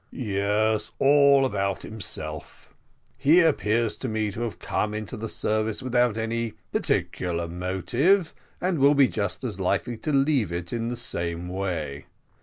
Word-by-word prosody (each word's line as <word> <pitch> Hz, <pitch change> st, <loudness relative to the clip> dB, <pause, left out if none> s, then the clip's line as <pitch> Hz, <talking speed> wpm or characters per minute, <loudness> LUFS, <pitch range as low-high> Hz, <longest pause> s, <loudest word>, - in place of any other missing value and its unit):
"Yes, 105 Hz, -1 st, 0 dB
all 140 Hz, -1 st, +5 dB
about 100 Hz, -5 st, -1 dB
himself. 80 Hz, -7 st, -7 dB, 0.5 s
He 150 Hz, +5 st, +6 dB
appears 115 Hz, -8 st, +2 dB
to 130 Hz, -, -4 dB
me 110 Hz, -2 st, -1 dB
to 110 Hz, -, -6 dB
have 120 Hz, -2 st, -3 dB
come 105 Hz, 0 st, -2 dB
into 110 Hz, -2 st, -5 dB
the 110 Hz, +1 st, -5 dB
service 110 Hz, +2 st, -1 dB
without 120 Hz, -3 st, +2 dB
any 115 Hz, 0 st, -2 dB, 0.2 s
particular 85 Hz, -2 st, -1 dB
motive, 95 Hz, -, +1 dB, 0.3 s
and 180 Hz, -3 st, 0 dB
will 140 Hz, +2 st, +5 dB
be 140 Hz, -2 st, +6 dB
just 105 Hz, +1 st, -3 dB
as 110 Hz, -7 st, -3 dB
likely 95 Hz, +5 st, 0 dB
to 155 Hz, -, -3 dB
leave 135 Hz, -, +2 dB
it 85 Hz, +2 st, -4 dB
in 115 Hz, -1 st, -2 dB
the 120 Hz, 0 st, -3 dB
same 85 Hz, -6 st, -2 dB
way. 85 Hz, -7 st, -3 dB
110 Hz, 150 wpm, -25 LUFS, 95-130 Hz, 0.5 s, He